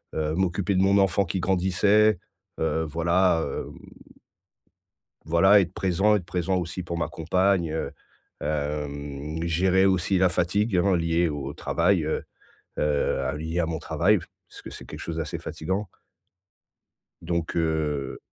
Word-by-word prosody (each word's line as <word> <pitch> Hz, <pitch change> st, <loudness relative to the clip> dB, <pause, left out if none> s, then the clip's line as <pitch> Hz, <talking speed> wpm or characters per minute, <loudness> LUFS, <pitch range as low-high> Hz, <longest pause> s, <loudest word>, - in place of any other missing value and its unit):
heu, 80 Hz, 0 st, -1 dB
m'occuper 95 Hz, +2 st, 0 dB
de 95 Hz, -, +3 dB
mon 100 Hz, +1 st, +4 dB
enfant 95 Hz, +1 st, +2 dB
qui 95 Hz, +2 st, -3 dB
grandissait, 95 Hz, +3 st, +3 dB, 0.4 s
heu, 80 Hz, 0 st, 0 dB
voilà, 85 Hz, +2 st, +2 dB
hem -, -, -5 dB, 1.5 s
voilà 90 Hz, +6 st, +5 dB
être 90 Hz, +1 st, -4 dB
présent 95 Hz, +3 st, +2 dB
être 90 Hz, -, -2 dB
présent 90 Hz, +1 st, -1 dB
aussi 90 Hz, +1 st, -4 dB
pour 85 Hz, 0 st, -4 dB
ma 85 Hz, -, -1 dB
compagne, 90 Hz, 0 st, +1 dB
heu, 80 Hz, -, -3 dB, 0.5 s
hem, 75 Hz, +1 st, -3 dB
gérer 95 Hz, +3 st, +3 dB
aussi 95 Hz, 0 st, +2 dB
la 90 Hz, 0 st, +4 dB
fatigue, 90 Hz, +4 st, 0 dB
hein, 95 Hz, +1 st, +3 dB
liée 85 Hz, 0 st, +1 dB
au 70 Hz, -1 st, -5 dB
travail, 95 Hz, -5 st, +1 dB
heu 80 Hz, -, -2 dB, 0.6 s
heu, 70 Hz, -1 st, 0 dB
lié 80 Hz, +3 st, -2 dB
à 85 Hz, -, +1 dB
mon 80 Hz, -1 st, -3 dB
travail. 105 Hz, +7 st, +2 dB, 0.3 s
Parce -, -, -13 dB
que -, -, -9 dB
c'est -, -, -10 dB
quelque -, -, -9 dB
chose 85 Hz, -, -5 dB
d'assez 80 Hz, -2 st, -3 dB
fatigant. 95 Hz, +5 st, -4 dB, 1.3 s
Donc 85 Hz, -1 st, -2 dB
heu, 75 Hz, -4 st, -1 dB
85 Hz, 145 wpm, -25 LUFS, 80-95 Hz, 1.5 s, voilà